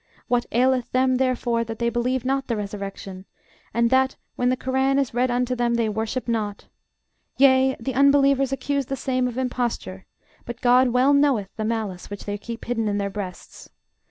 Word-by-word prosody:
What 245 Hz, -1 st, +1 dB
aileth 255 Hz, +1 st, +1 dB
them, 255 Hz, 0 st, +3 dB
therefore, 245 Hz, -2 st, 0 dB
that 225 Hz, 0 st, -6 dB
they 235 Hz, +1 st, 0 dB
believe 250 Hz, +1 st, -1 dB
not 270 Hz, +1 st, 0 dB
the 235 Hz, -, -1 dB
resurrection; 200 Hz, -2 st, -6 dB, 0.5 s
and 235 Hz, +1 st, +1 dB
that, 260 Hz, 0 st, +3 dB, 0.2 s
when 245 Hz, -, +1 dB
the 255 Hz, -, +1 dB
Korân 265 Hz, +2 st, +1 dB
is 270 Hz, -4 st, -1 dB
read 250 Hz, +2 st, +1 dB
unto 250 Hz, +1 st, 0 dB
them, 240 Hz, -1 st, +1 dB
they 230 Hz, -1 st, +1 dB
worship 220 Hz, +4 st, -3 dB
not? 215 Hz, -3 st, -2 dB, 0.7 s
Yea: 265 Hz, 0 st, +5 dB
the 255 Hz, +3 st, -3 dB
unbelievers 275 Hz, 0 st, +4 dB
accuse 275 Hz, 0 st, -2 dB
the 270 Hz, -, -2 dB
same 255 Hz, -2 st, -1 dB
of 245 Hz, 0 st, -6 dB
imposture: 240 Hz, -, -3 dB, 0.4 s
but 240 Hz, 0 st, -7 dB
GOD 250 Hz, +1 st, +4 dB
well 250 Hz, +3 st, +3 dB
knoweth 275 Hz, -9 st, +2 dB
the 215 Hz, -, -3 dB
malice 215 Hz, -5 st, -3 dB
which 205 Hz, -1 st, -8 dB
they 205 Hz, 0 st, -4 dB
keep 230 Hz, +2 st, -7 dB
hidden 230 Hz, -2 st, -1 dB
in 205 Hz, -1 st, 0 dB
their 200 Hz, -1 st, -2 dB
breasts. 195 Hz, -3 st, -8 dB
245 Hz, 185 wpm, -23 LUFS, 220-260 Hz, 0.7 s, Yea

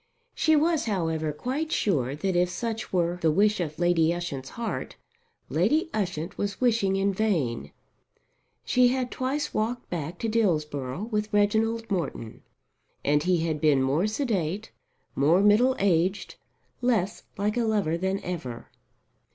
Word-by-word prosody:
She 315 Hz, -, +3 dB
was, 320 Hz, +1 st, +2 dB
however, 160 Hz, -7 st, -1 dB
quite 270 Hz, -, -3 dB
sure 140 Hz, -, 0 dB
that 190 Hz, +4 st, -1 dB
if 175 Hz, 0 st, +3 dB
such 225 Hz, +4 st, -4 dB
were 175 Hz, -1 st, 0 dB
the 160 Hz, -, +3 dB
wish 210 Hz, +5 st, +3 dB
of 155 Hz, -3 st, -3 dB
Lady 170 Hz, -2 st, +3 dB
Ushant's 145 Hz, -7 st, -4 dB
heart, 235 Hz, -1 st, -4 dB, 0.5 s
Lady 315 Hz, +2 st, +1 dB
Ushant 180 Hz, -3 st, -3 dB
was 200 Hz, -1 st, -2 dB
wishing 225 Hz, -6 st, +2 dB
in 195 Hz, +1 st, +1 dB
vain. 175 Hz, -, -1 dB, 0.9 s
She 250 Hz, 0 st, +4 dB
had 250 Hz, 0 st, -1 dB
twice 270 Hz, +3 st, -2 dB
walked 235 Hz, +3 st, -2 dB
back 170 Hz, 0 st, -4 dB
to 230 Hz, -, -2 dB
Dillsborough 155 Hz, -, 0 dB
with 210 Hz, 0 st, -1 dB
Reginald 220 Hz, +2 st, +1 dB
Morton, 140 Hz, -, -3 dB, 0.6 s
and 145 Hz, +1 st, +3 dB
he 175 Hz, 0 st, +1 dB
had 155 Hz, -3 st, -2 dB
been 145 Hz, -4 st, +4 dB
more 145 Hz, +9 st, +1 dB
sedate, 210 Hz, -, -2 dB, 0.4 s
more 155 Hz, +6 st, +4 dB
middle 230 Hz, +6 st, +5 dB
aged, 190 Hz, +1 st, +1 dB, 0.5 s
less 220 Hz, -5 st, 0 dB, 0.2 s
like 205 Hz, +2 st, 0 dB
a 240 Hz, -, +1 dB
lover 205 Hz, -7 st, +1 dB
than 190 Hz, +3 st, -1 dB
ever. 130 Hz, -10 st, -6 dB
190 Hz, 145 wpm, -26 LUFS, 160-225 Hz, 0.9 s, middle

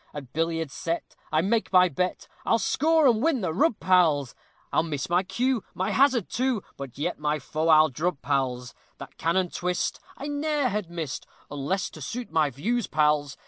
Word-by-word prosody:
At 135 Hz, -4 st, -8 dB
billiards 165 Hz, -2 st, -1 dB
set, 165 Hz, 0 st, -4 dB, 0.2 s
I 155 Hz, 0 st, +3 dB
make 220 Hz, +5 st, 0 dB
my 185 Hz, -1 st, +6 dB
bet, 180 Hz, +3 st, -2 dB, 0.2 s
I'll 230 Hz, -, +3 dB
score 315 Hz, +6 st, +2 dB
and 230 Hz, -4 st, +4 dB
win 295 Hz, -4 st, +2 dB
the 180 Hz, -4 st, -1 dB
rub, 230 Hz, -, +2 dB
pals; 165 Hz, -8 st, +3 dB, 0.4 s
I -, -, +4 dB
miss 155 Hz, -1 st, -4 dB
my 175 Hz, +1 st, +4 dB
cue, 245 Hz, +4 st, -1 dB
my 185 Hz, -, -1 dB
hazard, 260 Hz, -6 st, +3 dB
too, 250 Hz, -4 st, -1 dB
But 135 Hz, -3 st, -8 dB
yet 155 Hz, +4 st, -2 dB
my 150 Hz, 0 st, 0 dB
foe 155 Hz, +3 st, -3 dB
I'll 155 Hz, -1 st, +6 dB
drub, 155 Hz, +3 st, -2 dB
pals. 125 Hz, -3 st, -1 dB, 0.2 s
That -, -, -11 dB
cannon 175 Hz, +2 st, +1 dB
twist, 180 Hz, 0 st, -2 dB, 0.2 s
I 280 Hz, -, -6 dB
ne'er 290 Hz, -2 st, 0 dB
had 210 Hz, -5 st, -3 dB
missed, 165 Hz, -6 st, -5 dB, 0.2 s
Unless 145 Hz, +7 st, -2 dB
to 155 Hz, -, -11 dB
suit 235 Hz, -, -5 dB
my 155 Hz, -2 st, +2 dB
views, 215 Hz, -, -1 dB
pals. 150 Hz, -2 st, +1 dB
175 Hz, 185 wpm, -26 LUFS, 150-230 Hz, 0.4 s, my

